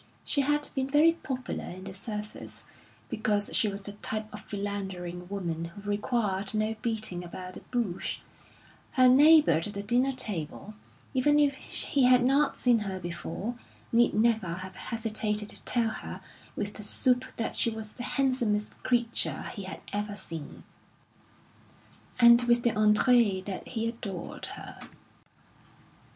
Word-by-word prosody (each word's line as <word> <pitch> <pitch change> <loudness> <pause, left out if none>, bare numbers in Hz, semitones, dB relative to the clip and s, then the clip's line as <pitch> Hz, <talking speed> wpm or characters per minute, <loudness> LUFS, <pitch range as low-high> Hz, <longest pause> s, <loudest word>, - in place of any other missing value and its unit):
She 285 - +1
had 295 +1 +1
been 265 0 -1
very 300 +4 +6
popular 265 -6 -5
in 185 +1 -8
the 190 0 -7
service, 210 +1 -6 0.4
because 210 -1 0
she 220 - +4
was 200 -1 -4
the 205 - -5
type 215 +1 -4
of 210 - -7
philandering 190 -4 -5
woman 170 -5 -3
who 170 +4 -10
required 205 -1 -1
no 215 +1 0
beating 220 -7 -2
about 180 +1 -8
the - - -7
bush; 230 -8 -2 0.8
her 255 -2 +6
neighbour 300 +4 +7
at 160 +1 +2
the 200 -1 -5
dinner 245 +5 +2
table, 205 - -4 0.4
even 290 +3 +3
if 290 -1 +4
he 270 0 -1
had 250 -1 +6
not 275 +2 +3
seen 245 -2 +4
her 195 -3 -4
before, 175 +5 -4 0.4
need 235 +1 +4
never 220 -2 +3
have 185 +2 -6
hesitated 215 -2 -2
to - - -5
tell 235 -2 +2
her - - -7 0.3
with 205 0 -3
the 215 - -8
soup 250 +4 +2
that 230 - -2
she - - +2
was 220 -1 -5
the 245 - -7
handsomest 245 -6 0
creature 235 -2 +1
he 200 -5 -6
had 190 - -7
ever 205 0 -2
seen, 165 -6 -7 1.6
and 235 0 +8
with 240 0 +3
the 240 - +3
entrée 210 -2 +4
that 195 -2 -5
he 225 -2 -2
adored 200 -6 -6
her. - - -9
215 Hz, 150 wpm, -29 LUFS, 200-245 Hz, 1.6 s, and